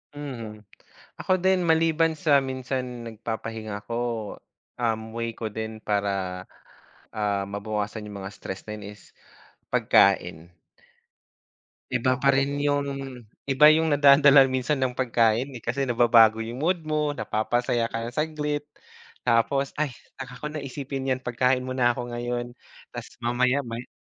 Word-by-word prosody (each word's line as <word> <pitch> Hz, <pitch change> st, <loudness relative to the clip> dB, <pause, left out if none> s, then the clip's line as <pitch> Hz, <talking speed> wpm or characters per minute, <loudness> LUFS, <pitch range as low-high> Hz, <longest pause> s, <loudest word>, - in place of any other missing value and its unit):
Mhm. 115 Hz, -7 st, -7 dB, 0.6 s
Ako 185 Hz, 0 st, +2 dB
din 190 Hz, 0 st, +2 dB
maliban 165 Hz, -1 st, +2 dB
sa 140 Hz, -3 st, +4 dB
minsan 130 Hz, -2 st, -4 dB
nagpapahinga 110 Hz, -2 st, -6 dB
ako, 115 Hz, 0 st, -3 dB, 0.8 s
um, 115 Hz, -2 st, -1 dB
way 115 Hz, 0 st, -2 dB
ko 115 Hz, -, -5 dB
din 110 Hz, +1 st, -5 dB
para, 100 Hz, -3 st, -2 dB, 0.7 s
ah, 100 Hz, -2 st, -1 dB
mabawasan 105 Hz, +1 st, -4 dB
yung 100 Hz, -1 st, -8 dB
mga 100 Hz, +2 st, -7 dB
stress 95 Hz, -, -7 dB
na 105 Hz, 0 st, -6 dB
yun 105 Hz, 0 st, -9 dB
is -, -, -20 dB, 0.6 s
pagkain. 90 Hz, -4 st, +3 dB, 1.4 s
Iba 130 Hz, +1 st, +1 dB
pa 135 Hz, 0 st, +4 dB
rin 140 Hz, +1 st, 0 dB
yun 145 Hz, 0 st, +1 dB, 0.6 s
iba 140 Hz, +2 st, +5 dB
yung 160 Hz, +1 st, +3 dB
nadadala 140 Hz, -1 st, +7 dB
minsan 130 Hz, +2 st, 0 dB
ng 130 Hz, -2 st, 0 dB
pagkain, 120 Hz, -1 st, +1 dB
eh. 115 Hz, -, -9 dB
Kasi 135 Hz, +3 st, -1 dB
nababago 115 Hz, -2 st, +5 dB
yung 120 Hz, +3 st, -6 dB
mood 170 Hz, +2 st, 0 dB
mo, 150 Hz, -1 st, -1 dB
napapasaya 120 Hz, +1 st, 0 dB
ka 115 Hz, 0 st, -4 dB
ng 120 Hz, -, -5 dB
saglit, 150 Hz, 0 st, -2 dB, 0.6 s
tapos, 125 Hz, +4 st, +2 dB
"Ay, 140 Hz, -5 st, -1 dB, 0.2 s
saka 125 Hz, -1 st, -7 dB
ko -, -, -7 dB
naisipin 135 Hz, -2 st, -5 dB
yan, 130 Hz, 0 st, -2 dB
pagkain 125 Hz, +1 st, +1 dB
muna 130 Hz, -1 st, +2 dB
ako 120 Hz, -1 st, -5 dB
ngayon." 120 Hz, 0 st, -3 dB, 0.4 s
Tapos -, -, -9 dB
mamaya 125 Hz, +3 st, +1 dB
may 115 Hz, +1 st, -6 dB
125 Hz, 135 wpm, -25 LUFS, 110-140 Hz, 1.4 s, nadadala